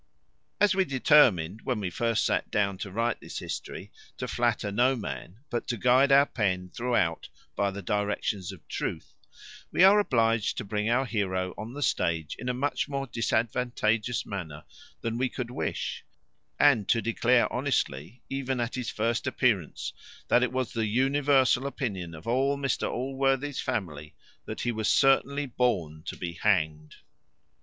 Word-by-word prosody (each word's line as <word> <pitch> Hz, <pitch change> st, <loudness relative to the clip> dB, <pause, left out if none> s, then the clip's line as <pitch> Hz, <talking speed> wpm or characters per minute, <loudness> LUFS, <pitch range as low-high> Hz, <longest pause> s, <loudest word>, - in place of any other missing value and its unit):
As 205 Hz, -2 st, +4 dB
we 190 Hz, 0 st, +3 dB
determined, 125 Hz, -, +4 dB
when 125 Hz, -4 st, -2 dB
we 95 Hz, -3 st, -3 dB
first 115 Hz, +4 st, 0 dB
sat -, -, 0 dB
down 100 Hz, -2 st, 0 dB
to 100 Hz, -, -5 dB
write 115 Hz, +5 st, -1 dB
this -, -, -8 dB
history, -, -, -6 dB, 0.3 s
to -, -, -4 dB
flatter 100 Hz, -, 0 dB
no 125 Hz, +6 st, +3 dB
man, 90 Hz, -, -7 dB
but 120 Hz, -, -2 dB
to 120 Hz, -, -2 dB
guide 130 Hz, +5 st, +4 dB
our 140 Hz, +1 st, +7 dB
pen 95 Hz, -8 st, -1 dB
throughout 115 Hz, -9 st, -1 dB, 0.3 s
by 100 Hz, -, +1 dB
the 100 Hz, 0 st, -7 dB
directions 105 Hz, -1 st, -1 dB
of 90 Hz, -5 st, -14 dB
truth, -, -, -4 dB, 0.6 s
we -, -, +4 dB
are 200 Hz, +2 st, +8 dB
obliged 115 Hz, -, +1 dB
to -, -, -2 dB
bring 105 Hz, +2 st, -1 dB
our 125 Hz, +3 st, +2 dB
heroe 95 Hz, -5 st, -1 dB
on 110 Hz, +3 st, -7 dB
the 145 Hz, -, -2 dB
stage 80 Hz, -, 0 dB
in 125 Hz, -, -3 dB
a -, -, +3 dB
much 140 Hz, +2 st, -1 dB
more 140 Hz, -1 st, -2 dB
disadvantageous 115 Hz, -1 st, 0 dB
manner 80 Hz, -7 st, -6 dB, 0.4 s
than 115 Hz, +1 st, -2 dB
we 130 Hz, 0 st, +1 dB
could 120 Hz, -1 st, -5 dB
wish; -, -, -3 dB, 0.6 s
and 125 Hz, -9 st, +4 dB
to 115 Hz, -, +4 dB
declare 120 Hz, +2 st, +2 dB
honestly, 80 Hz, -, -2 dB
even 135 Hz, -1 st, -2 dB
at 120 Hz, 0 st, -2 dB
his 125 Hz, -3 st, -3 dB
first 115 Hz, +4 st, -1 dB
appearance, 115 Hz, -, 0 dB, 0.4 s
that 120 Hz, -, +5 dB
it 125 Hz, -2 st, +1 dB
was 130 Hz, -1 st, -2 dB
the 115 Hz, -2 st, 0 dB
universal 135 Hz, +2 st, +3 dB
opinion 95 Hz, -12 st, -4 dB
of 80 Hz, -, -12 dB
all 135 Hz, +4 st, +1 dB
Mr 135 Hz, -3 st, -1 dB
Allworthy's 135 Hz, +2 st, -1 dB
family 75 Hz, -6 st, -4 dB, 0.3 s
that -, -, -5 dB
he 120 Hz, -, 0 dB
was 110 Hz, -2 st, -2 dB
certainly 140 Hz, +1 st, +3 dB
born 95 Hz, -, -1 dB
to -, -, -5 dB
be 85 Hz, -1 st, -4 dB
hanged. 80 Hz, -6 st, 0 dB
115 Hz, 165 wpm, -28 LUFS, 100-130 Hz, 0.6 s, are